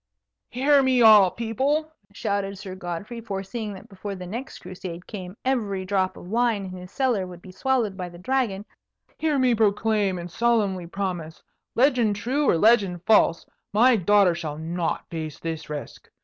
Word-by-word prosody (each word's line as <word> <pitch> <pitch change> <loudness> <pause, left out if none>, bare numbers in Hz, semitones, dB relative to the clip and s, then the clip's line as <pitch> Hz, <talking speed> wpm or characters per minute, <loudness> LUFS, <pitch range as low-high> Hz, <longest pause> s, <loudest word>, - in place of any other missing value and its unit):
"Hear 275 +3 +4
me, 260 -2 +3
all 210 -4 +8
people!" 270 - -1 0.2
shouted 200 -1 -2
Sir 190 -1 -7
Godfrey, 185 +6 -6
foreseeing 210 +1 -5
that 190 - -12
before 200 0 -7
the 185 -1 -8
next 235 +9 -6
Crusade 180 -1 -8
came 185 -1 -8
every 210 -8 -1
drop 185 -1 0
of - - -11
wine 225 -1 +1
in 185 - -7
his 180 0 -9
cellar 245 -9 0
would 175 -1 -10
be 185 - -12
swallowed 225 0 0
by 180 -2 -5
the 175 - -13
Dragon; 210 -1 -1 0.5
"hear 310 -2 +1
me 255 -2 +3
proclaim 210 -2 +1
and 175 0 -7
solemnly 205 -6 +1
promise: 175 -4 -4 0.3
legend 245 -5 +3
true 260 +8 0
or - - +4
legend 200 -4 +3
false, 210 -6 +4 0.3
my 240 +4 +5
daughter 200 -2 +4
shall 155 -3 -5
not 165 +1 -3
face 160 -3 -5
this 160 -2 -5
risk. 150 -2 -7
200 Hz, 165 wpm, -25 LUFS, 180-235 Hz, 0.5 s, all